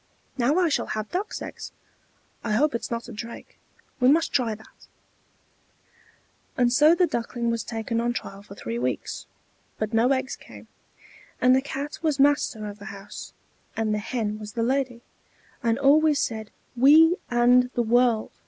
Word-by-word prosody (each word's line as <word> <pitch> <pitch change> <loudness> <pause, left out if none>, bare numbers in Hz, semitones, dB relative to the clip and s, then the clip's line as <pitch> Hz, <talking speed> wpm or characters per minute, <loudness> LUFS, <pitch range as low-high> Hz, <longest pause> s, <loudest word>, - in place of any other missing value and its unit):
"Now 255 +3 +2
I 365 -2 +3
shall 300 - 0
have 215 0 -5
duck's 390 +4 -3
eggs. - - -8 0.7
I 225 - -1
hope 290 +7 +2
it 235 - -2
is - - -6
not 235 0 -4
a - - -9
drake. 230 +2 -9 0.4
We 250 0 +5
must 320 +3 +3
try 235 -5 +1
that." 220 - -19 1.7
And 245 -1 +3
so 300 +5 +6
the 360 - +4
Duckling 235 -4 -2
was 230 -1 -2
taken 230 0 -3
on 240 +1 0
trial 195 -4 -6
for 200 -1 -13
three 115 - -4
weeks, 125 0 -3 0.5
but 215 +1 -3
no 230 +3 +3
eggs 260 0 -1
came. - - -14 0.7
And 255 0 +5
the 265 - +3
Cat 280 +1 -5
was 305 -4 0
master 275 -6 +2
of 205 0 -7
the 205 - -11
house, 200 -2 -9 0.4
and 220 -1 0
the 210 - 0
Hen 215 -1 -3
was 210 -1 -8
the 230 -2 -1
lady, 250 -1 -1 0.6
and 230 -2 +1
always 295 +2 +4
said 220 -5 -2 0.3
"We 315 +7 +6
and 245 +1 +4
the 240 - +2
world!" 235 -1 +2
240 Hz, 170 wpm, -25 LUFS, 220-275 Hz, 1.7 s, so